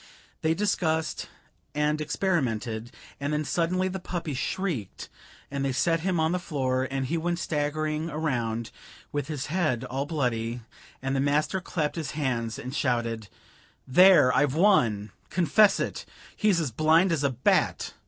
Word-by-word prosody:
They 160 +1 +2
discussed 160 -5 0 0.5
and 150 +1 +1
experimented, 120 - -1 0.3
and 140 +2 -2
then 150 0 0
suddenly 180 +4 0
the 190 +1 -4
puppy 175 -4 -4
shrieked, 135 - -3 0.4
and 140 -1 -2
they 135 - 0
set 165 +6 +2
him 180 0 0
on 160 +1 +2
the 180 - 0
floor, 130 -6 -1
and 135 -1 -2
he 165 +6 -1
went 175 +1 -1
staggering 155 0 -1
around, 120 -8 -2 0.4
with 145 -2 -2
his 150 -3 -3
head 155 -10 +1
all 135 +2 -3
bloody, 120 -6 -1 0.4
and 135 0 -1
the - - +1
master 150 +7 +1
clapped 160 -3 -2
his 155 -4 -3
hands 120 -6 -1
and 125 +2 -6
shouted: 115 -6 -1 0.6
"There, 175 -2 +6
I've 145 -2 +2
won 120 - +3 0.2
confess 195 +3 +4
it! - - -3 0.3
He's 210 -5 +2
as 150 -6 -1
blind 160 - +4
as 155 -3 0
a 140 - +3
bat!" 125 -1 +1
150 Hz, 155 wpm, -27 LUFS, 130-170 Hz, 0.6 s, There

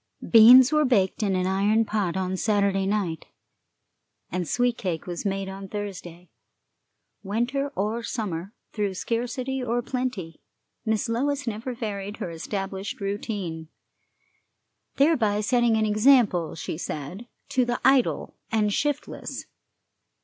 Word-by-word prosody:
Beans 245 +4 +9
were 305 0 +4
baked 225 -7 +2
in 200 -3 +1
an 185 0 0
iron 205 +4 +2
pot 200 -4 -1
on 190 0 -1
Saturday 200 -1 +1
night, 195 -6 -2 1.0
and 180 -1 -2
sweet 245 +7 +1
cake 175 -7 -3
was 175 +2 -4
made 195 0 -2
on 195 0 -7
Thursday. 180 -4 -7 0.9
Winter 240 +7 -1
or 215 +4 -1
summer, 200 -6 -4 0.2
through 205 -3 -1
scarcity 245 +5 -2
or 240 0 -1
plenty, 225 -12 -4 0.4
Miss 220 -1 0
Lois 280 +5 -1
never 230 +2 -4
varied 205 -3 -5
her 170 - -5
established 195 +3 -5
routine, 195 -5 -4 1.3
thereby 245 -9 +3
setting 235 +1 +2
an 220 - +2
example, 215 - +3
she 160 0 -5
said, 180 - -6 0.2
to 255 - +2
the 240 0 -1
idle 265 -2 +3 0.2
and 210 -2 +1
shiftless. 290 +3 -3
210 Hz, 125 wpm, -25 LUFS, 190-240 Hz, 1.3 s, Beans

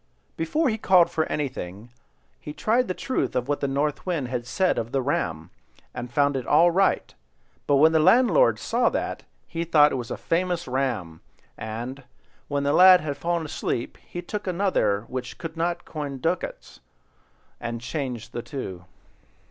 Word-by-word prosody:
Before 285 - 0
he 220 -3 -1
called 185 -4 +5
for 160 - 0
anything, 120 -7 -5 0.5
he 150 - -8
tried 235 +9 +1
the 185 - -2
truth 260 - -2
of 125 0 0
what 145 0 0
the 140 - -1
North 140 +2 -1
Wind 160 -9 -2
had 120 -1 -3
said 185 +7 +1
of 115 +1 -5
the 135 - +1
ram, 85 - -2 0.4
and 120 0 -6
found 145 +2 +2
it 130 -2 -3
all 170 +4 +5
right; 195 +3 +1 0.5
but 145 - +4
when 155 +3 +6
the 160 - +3
landlord 255 - +5
saw - - +1
that, - - -3 0.3
he 165 0 -3
thought 150 -3 +5
it - - -1
was 115 - -10
a - - -4
famous 175 0 -1
ram, 120 -11 -2 0.3
and, 120 +5 -6 0.4
when 140 -1 -1
the 140 +1 +1
lad 185 +1 +8
had 150 -2 -3
fallen 170 0 -1
asleep, 135 -5 -3
he 175 - -7
took 205 +3 -5
another 175 - +1
which 125 -1 -6
couldn't 170 +1 -3
coin 145 -3 -5
gold 135 - -9
ducats, 170 +2 -3 0.8
and 120 0 -4
changed 125 -2 -5
the 120 - -3
two. 95 - -7
145 Hz, 170 wpm, -25 LUFS, 125-175 Hz, 0.8 s, lad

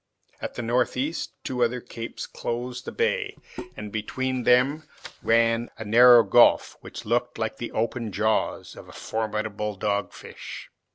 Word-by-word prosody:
At - - -5
the 120 - -4
northeast 125 +6 -1
two 125 -1 0
other 120 +1 0
capes 115 -1 -7
closed 125 +1 -5
the - - -5
bay, 470 +2 -1 0.4
and 105 - -7
between 130 +4 -2
them 140 +5 +3 0.3
ran 115 +1 +2
a 110 - -7
narrow 120 +2 +8
gulf, 100 - +4
which - - -9
looked 120 +2 0
like 110 -1 -3
the 120 - -4
half - - -9
open 115 0 -1
jaws 110 +3 -1
of - - -12
a - - -12
formidable 105 -1 -3
dog 100 +1 -1
fish. - - -10
115 Hz, 155 wpm, -25 LUFS, 110-125 Hz, 0.4 s, narrow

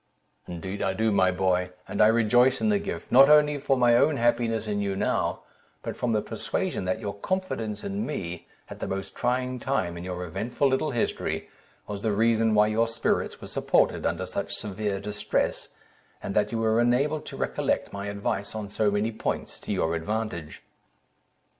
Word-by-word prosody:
"Indeed 95 +3 -5
I 95 - +1
do, 110 +2 +1
my 95 -2 +4
boy; 90 0 +1 0.2
and - - -1
I 105 - +8
rejoice 120 +4 +4
in 220 - +1
the 205 -1 +3
gift, - - -6
not 135 +3 +8
only 150 -1 +5
for 135 -1 +1
my 120 -1 +5
own 145 +4 +4
happiness 115 -2 +1
in 105 -1 -1
you 100 -1 -1
now, - - 0 0.4
but - - -4
from 125 - -1
the 105 -1 +1
persuasion - - -2
that 95 - -1
your 100 - -4
confidence 115 - -3
in 200 +1 -2
me, 90 - -5 0.2
at - - -10
the - - -3
most 95 0 -4
trying 125 +1 -1
time 110 -9 -1
in - - -7
your 90 0 -4
eventful 110 - -1
little 135 +3 +1
history, 120 -4 -2 0.4
was 100 -1 -5
the 110 -1 0
reason 110 +1 +3
why 105 0 +6
your 110 +2 +2
spirits 115 0 -1
were - - -8
supported - - +1
under 85 +2 -2
such 95 +2 -4
severe 105 -1 -3
distress, 105 +1 -2 0.5
and 100 - -3
that 105 0 +1
you 115 - -1
were 115 +1 +2
enabled 140 +6 +1
to - - -7
recollect - - -1
my 100 0 -4
advice 100 0 -3
on 105 -2 -5 0.2
many 105 +2 0
points, 110 - -4
to - - -6
your 80 - 0
advantage." 85 -2 -4
110 Hz, 185 wpm, -27 LUFS, 100-120 Hz, 0.5 s, I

